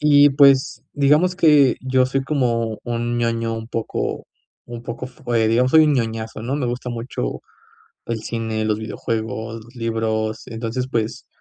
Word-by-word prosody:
Y 145 -1 +6
pues, 140 -1 +4
digamos 150 +6 +3
que 150 -6 +5
yo 130 -1 +2
soy 135 +1 -1
como 115 -6 0
un 120 0 -2
ñoño, 115 -1 0
un 115 0 -7
poco 115 -2 -3 0.4
un 120 -1 -8
poco 120 +1 -6
f 130 -1 -12
eh, 110 -1 +3
digamos, 125 +3 +2
soy 160 0 +7
un 150 - +3
ñoñazo, 115 -4 -2
¿no? 125 +5 -2
Me 145 - -2
gusta 125 +1 -3
mucho 115 - -4 0.6
el 115 -1 -3
cine, 110 -1 -3
los 105 -1 0
videojuegos, 110 0 -4
los 120 +3 -18
libros. 110 -2 -2
Entonces, 115 +2 -3
pues, 115 -3 -2
120 Hz, 165 wpm, -21 LUFS, 115-130 Hz, 0.6 s, soy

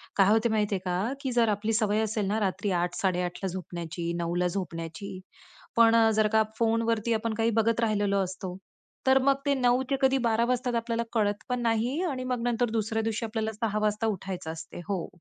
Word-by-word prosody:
काय 195 -1 +5
होत 225 +2 +4
माहिती 210 -2 +1
आहे - - -2
का, 185 +8 -1
की 265 - -2
जर 235 -2 +3
आपली 210 +2 0
सवय 215 -1 +2
असेल 215 -1 -1
ना 210 +2 0
रात्री 200 0 -1
8:00-8:30 180 0 -1
ला - - +1
झोपण्याची, 170 -2 -5
9:00 170 0 -2
ला 180 0 +2
झोपण्याची. 180 +1 -5 0.6
पण 230 0 +6
अ, 225 -1 +5
जर 215 0 +3
का 220 0 +5
फोनवरती 230 0 +1
आपण 225 0 -1
काही 225 +1 +1
बघत 230 +1 +2
राहिलेलो 205 -3 +1
असतो, 185 0 -6 0.5
तर 265 0 +6
मग 275 0 +4
ते 285 - +3
9:00 250 -1 +2
ते 275 - +2
कधी 265 0 +4
12:00 235 -1 +2
वाजता 250 -1 0
आपल्याला 230 0 -1
कळत 205 -2 +2 0.2
पण 250 0 0
नाही 235 +7 0
आणि 265 -7 -2
मग 250 -2 -2
नंतर 240 0 +1
दुसऱ्या 220 0 -1
दिवशी 225 +1 -1
आपल्याला 220 0 -2
6:00 215 -1 -1
वाजता 215 +1 0
उठायचं 190 -5 -4
असते. 160 +1 -8
हो. 190 -4 -1
220 Hz, 200 wpm, -28 LUFS, 195-230 Hz, 0.6 s, पण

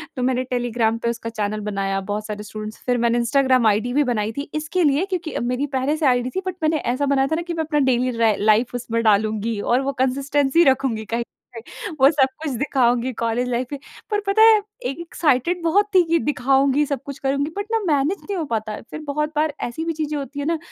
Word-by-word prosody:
तो 255 - -3
मैंने 255 0 +1
टेलीग्राम 235 -2 0
पे 235 0 -2
उसका 230 -1 -4
चैनल 215 -1 -3
बनाया। 195 0 -1
बहुत 205 +2 -4
सारे 210 0 -5
स्टूडेंट्स 215 0 -7
फिर 245 -1 +1
मैंने 235 0 +2
इंस्टाग्राम 255 -1 +3
आईडी 215 +4 +1
भी 295 +1 +3
बनाई 210 0 -1
थी, 280 +4 -6
इसके 325 +4 -1
लिए 295 +4 +2
क्योंकि 340 -3 -3
मेरी 250 +4 -1
पहले 285 +4 0
से 310 - -1
आईडी 250 -1 +2
थी 380 - 0
बट 370 - -3
मैंने 310 0 +2 0.2
ऐसा 285 +3 -1
बनाया 275 -1 +2
था - - +3
ना 340 - -2
कि 345 - -2
मैं 320 -1 -1
अपना 300 -1 0
डेली 255 0 +2
र 220 -3 +4
लाइफ 230 +4 +3
उसमें 230 -1 -2
डालूँगी 215 +1 +1
और 245 +5 +2
वो 275 +1 -1
कंसिस्टेंसी 275 +4 +2
रखूँगी 260 -5 +1
कहीं 230 +3 -2
न - - -1 0.4
कहीं। 310 +7 -8
वो 270 - +8
सब 275 -4 +3 0.2
कुछ 295 - -2
दिखाऊँगी 250 -3 +1
कॉलेज 230 +2 0
लाइफ 245 +1 -1
पे 285 - -4 0.3
पर 415 - +2
पता 415 +2 +3
है 445 -1 +8 0.3
एक् 275 +6 -3
एक्साइटेड 340 0 0
बहुत 395 +5 +3
थी 365 - +7
कि 335 - +3
दिखाऊँगी 275 0 +2
सब 280 -3 -3
कुछ 280 -1 -7
करूँगी 280 +3 -1
बट 405 - -2
ना 450 - +2
मैनेज 300 +4 +1
नहीं 400 -2 -4
हो 330 - -1
पाता। 215 -3 -3
फिर - - -6
बहुत 300 +1 -1
बार 305 0 +1
ऐसी 315 +7 -5
भी 330 - -1
चीज़ें 305 -1 -3
होती 285 0 -6
है 285 - -3
ना 330 0 +1
265 Hz, 230 wpm, -22 LUFS, 235-300 Hz, 0.4 s, वो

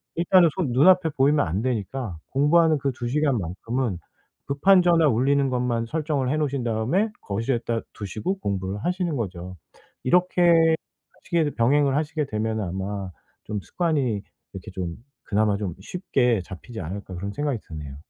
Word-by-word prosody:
일단은 170 0 +5
손 145 -10 -1
눈 140 +8 +5
앞에 180 -3 +4
보이면 145 - +3
안 95 +6 -1
되니까 115 -4 -3
공부하는 155 +3 +4
그 140 0 0
2 120 -1 -5
시간 140 0 +1
만큼은 105 +4 -3 0.5
급한 180 +7 +5
전화 170 -3 +4
울리는 135 +2 +2
것만 125 -2 0
설정을 150 -3 -1
해 150 - +1
놓으신 140 -4 -1
다음에 120 - +1
거실에다 115 +2 -2
두시고 110 - -4
공부를 100 - -3
하시는 180 -3 -1
거죠. 90 -4 -5 0.5
이렇게 170 0 +4 0.5
시계를 160 -4 +1
병행을 135 +3 +3
하시게 150 0 -1
되면은 110 -1 -2
'아마 95 +1 -4 0.3
좀 105 -2 -3
습관이 165 - -1 0.5
이렇게 95 +1 -8
좀 90 -3 -4 0.3
그나마 105 0 +1
좀 100 -4 -3
쉽게 125 - 0
잡히지 100 +5 -9
않을까?' 95 +3 -6
그런 100 +3 -4
생각이 145 -6 -1
드네요. 75 -4 -8
125 Hz, 340 characters per minute, -24 LUFS, 100-155 Hz, 0.5 s, 일단은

